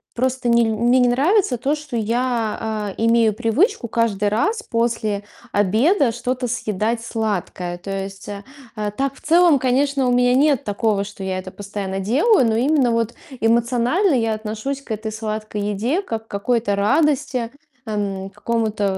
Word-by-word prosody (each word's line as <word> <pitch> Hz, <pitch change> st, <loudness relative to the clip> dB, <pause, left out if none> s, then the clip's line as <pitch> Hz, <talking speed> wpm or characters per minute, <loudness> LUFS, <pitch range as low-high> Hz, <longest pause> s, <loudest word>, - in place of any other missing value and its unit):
просто 255 Hz, 0 st, 0 dB
не 235 Hz, 0 st, +4 dB
мне 235 Hz, +3 st, +2 dB
не 245 Hz, -, +4 dB
нравится 280 Hz, -, +2 dB
то, 275 Hz, +5 st, 0 dB
что 300 Hz, -4 st, -7 dB
я, 225 Hz, -3 st, -1 dB
э, -, -, -2 dB
имею 230 Hz, -2 st, +4 dB
привычку 235 Hz, -, +1 dB
каждый 210 Hz, -3 st, 0 dB
раз 425 Hz, -, 0 dB
после 225 Hz, -3 st, -1 dB, 0.3 s
обеда 230 Hz, -, +3 dB
что-то 250 Hz, +2 st, -2 dB
съедать 225 Hz, -1 st, -1 dB
сладкое. 185 Hz, -5 st, -3 dB
То 195 Hz, +3 st, -8 dB
есть, 195 Hz, 0 st, -5 dB
э, 200 Hz, -1 st, -6 dB, 0.6 s
так, 275 Hz, 0 st, 0 dB
в -, -, -18 dB
целом, 335 Hz, -2 st, +4 dB
конечно, 265 Hz, +1 st, +1 dB
у -, -, +2 dB
меня 245 Hz, 0 st, +3 dB
нет 280 Hz, 0 st, +3 dB
такого, 205 Hz, -1 st, 0 dB
что 200 Hz, -1 st, -9 dB
я 190 Hz, -1 st, -2 dB
это 185 Hz, 0 st, -7 dB
постоянно 200 Hz, -1 st, -5 dB
делаю, 260 Hz, -, +3 dB
но 220 Hz, -, +1 dB
именно 260 Hz, +1 st, +2 dB
вот 230 Hz, 0 st, 0 dB, 0.3 s
эмоционально 240 Hz, -, +2 dB
я 225 Hz, -3 st, +1 dB
отношусь 220 Hz, +6 st, -4 dB
к 275 Hz, -, -21 dB
этой 220 Hz, 0 st, -3 dB
сладкой 215 Hz, -1 st, -4 dB
еде, 210 Hz, -, -1 dB
как 225 Hz, -, -5 dB
какой-то 220 Hz, 0 st, 0 dB
радости, 265 Hz, +2 st, +1 dB, 0.4 s
м, 195 Hz, -2 st, -3 dB
какому-то, 220 Hz, -2 st, -2 dB
230 Hz, 155 wpm, -21 LUFS, 210-260 Hz, 0.6 s, не